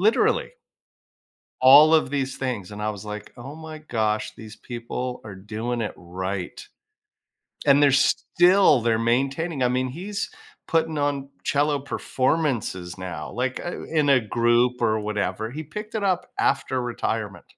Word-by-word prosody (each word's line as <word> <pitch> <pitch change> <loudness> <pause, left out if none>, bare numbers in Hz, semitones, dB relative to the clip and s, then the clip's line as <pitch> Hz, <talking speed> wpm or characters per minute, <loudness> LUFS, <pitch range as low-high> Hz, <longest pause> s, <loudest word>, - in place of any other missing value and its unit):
Literally 215 +4 +2 1.1
all 145 +5 +8
of 155 -4 +4
these 135 -2 -2
things, 120 -8 -3
and 105 0 -7
I 105 - 0
was 105 -2 -6
like, 105 0 -7
"Oh 130 +4 -9
my 160 -1 -9
gosh, 110 -7 -1
these 110 -1 -11
people 125 +1 -5
are 100 -3 -8
doing 110 +5 -4
it 105 - -3
right." 95 +1 -5 1.1
And 145 0 +6
they're 140 - +6
still 175 +2 +4
they're 115 -1 +2
maintaining 135 +6 0
I - - +4
mean, 130 +1 0
he's 195 - -4 0.4
putting 160 -1 +1
on 145 -1 -1 0.2
cello 145 0 +1
performances 130 - -1
now, 90 -4 -6
like, 130 +2 -2
uh, 175 - -5
in 155 -3 +1
a 135 - +6
group 120 +2 +2
or 110 -1 +2
whatever. 105 +1 -2
He 155 +4 -6
picked 210 +9 -8
it 215 - -1
up 185 -2 0
after 130 -2 +1
retirement. 110 -5 -3
125 Hz, 150 wpm, -24 LUFS, 110-145 Hz, 1.1 s, all